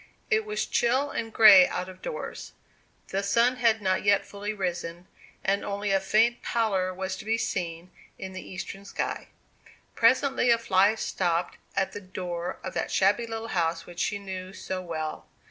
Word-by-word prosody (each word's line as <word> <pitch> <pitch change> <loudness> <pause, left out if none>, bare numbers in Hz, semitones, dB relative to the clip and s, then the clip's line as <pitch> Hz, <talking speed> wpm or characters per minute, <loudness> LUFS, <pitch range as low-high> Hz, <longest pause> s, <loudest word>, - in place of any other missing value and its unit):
It 435 0 +3
was 425 0 -2
chill 260 +4 +1
and 225 -1 -4
grey 205 -5 +9
out 180 0 -3
of 185 0 -12
doors. - - -6 0.6
The 195 - -1
sun 235 +5 +2
had 225 -3 +2
not 185 0 +1
yet 200 -1 +3
fully 205 +1 -5
risen, 175 -3 -4 0.4
and 200 +1 +1
only 200 0 -2
a 195 - +4
faint 225 +5 +2
pallor 195 -5 0
was 190 +1 -4
to - - -8
be 225 +1 0
seen 175 -4 -3 0.3
in 190 0 -7
the 185 - -6
eastern 195 +2 -7
sky. 200 - -4 0.7
Presently 260 +2 +3
a 235 - +6
fly 200 -1 +3
stopped 175 -5 -1 0.2
at 190 - 0
the 205 - -7
door 180 -2 -5
of 185 - -5
that - - -2
shabby 205 +5 +2
little 225 0 -5
house 170 -3 0
which 175 0 -10
she 205 - 0
knew 190 -1 -7
so 185 -2 -5
well. 160 -3 -5
195 Hz, 175 wpm, -27 LUFS, 185-225 Hz, 0.7 s, grey